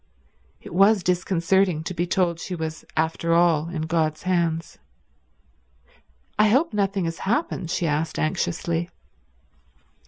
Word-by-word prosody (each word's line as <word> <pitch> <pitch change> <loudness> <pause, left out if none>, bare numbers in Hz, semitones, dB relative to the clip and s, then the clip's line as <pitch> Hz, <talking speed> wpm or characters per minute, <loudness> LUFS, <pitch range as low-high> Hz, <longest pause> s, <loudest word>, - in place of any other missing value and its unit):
It - - -10
was 195 +2 +4
disconcerting 180 -1 +1
to 185 - -4
be 175 0 -1
told 175 -2 +1
she 180 - -5
was 160 -1 -5
after 165 +1 +1
all 170 -2 +3
in 165 -3 -3
God's 160 -1 -1
hands. 170 -3 -1 1.6
"I 215 - +6
hope 265 +5 +2
nothing 195 -2 0
has 165 0 -4
happened?" 200 - -1
she 170 - -1
asked 155 +1 -1
anxiously. 170 +1 -1
170 Hz, 125 wpm, -24 LUFS, 160-190 Hz, 1.6 s, I